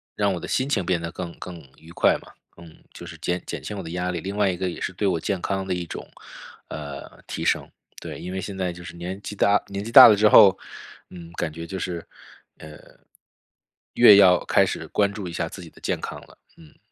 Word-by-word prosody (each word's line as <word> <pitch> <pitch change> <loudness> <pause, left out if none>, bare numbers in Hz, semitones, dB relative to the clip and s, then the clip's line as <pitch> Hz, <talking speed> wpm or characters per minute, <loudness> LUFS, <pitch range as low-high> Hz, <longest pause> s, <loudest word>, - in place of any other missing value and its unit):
让 100 -1 +1
我 - - -5
的 - - -7
心 130 +2 -1
情 100 -11 0
变 90 -2 0
得 85 0 -5
更 85 -2 -7
更 90 -2 -8 0.2
愉 80 +1 -16
快 - - +3
嘛。 - - -16 0.3
嗯， 85 -2 -15
就 - - -10
是 - - -10
减 90 0 -2
减 - - -5
轻 105 - -6
我 95 - -4
的 80 - -8
压 90 +1 -2
力， 85 - -4
另 100 +3 -5
外 100 -2 +2
一 90 - -4
个 95 0 -2
也 85 - -7
是 95 - -4
对 100 +2 -1
我 90 -4 0
健 95 +2 -3
康 95 -1 -2
的 95 - -2
一 90 - -3
种， - - -8 0.6
呃， 70 -2 -9
提 - - -5
升。 - - 0 0.3
对， - - -8
因 90 - -6
为 95 - -3
现 100 +1 -6
在 95 -2 -2
就 90 0 -11
是 85 - -10
年 90 +3 -6
纪 105 - -6
大 100 +1 +3
年 100 0 -5
纪 115 - -7
大 130 +1 +11
了 110 - +6
之 105 +1 +4
后， 95 -3 +7 0.5
嗯， 85 -2 -11
感 85 -2 -3
觉 85 +1 -8
就 95 - -5
是， 85 -2 -4 0.5
呃， 75 -1 -12 1.1
越 105 - +8
要 90 -4 +6
开 - - +3
始 - - -5
关 100 -1 +1
注 100 -3 -7
一 85 - -6
下 85 -1 -2
自 95 - -10
己 85 - -11
的 - - -20
健 - - -2
康 - - -6
了， - - -19 0.2
嗯。 80 -3 -18
90 Hz, 265 characters per minute, -24 LUFS, 85-100 Hz, 1.1 s, 大